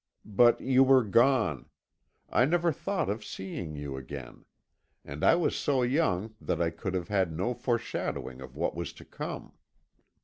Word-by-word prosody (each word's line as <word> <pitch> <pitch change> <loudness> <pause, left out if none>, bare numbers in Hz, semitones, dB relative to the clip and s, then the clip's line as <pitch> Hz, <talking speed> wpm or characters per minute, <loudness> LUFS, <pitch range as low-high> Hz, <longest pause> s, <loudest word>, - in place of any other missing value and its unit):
But 115 +3 +4
you 130 0 +4
were 130 -1 +6
gone 115 - +2 0.6
I 125 - +3
never 170 +3 +2
thought 195 - -2
of 105 +2 -2
seeing 95 -5 -6
you 70 -2 -5
again 65 - -9 0.6
and 70 +2 -7
I - - +6
was 175 - +1
so 135 -4 +1
young 120 - +1
that - - -1
I 85 -1 +1
could 90 +3 -4
have 90 -2 -3
had 95 -4 +1
no 95 +10 -1
foreshadowing 115 - -3
of 65 0 -10
what 80 - -1
was 85 0 -4
to - - -14
come. - - -7
105 Hz, 165 wpm, -29 LUFS, 85-130 Hz, 0.6 s, were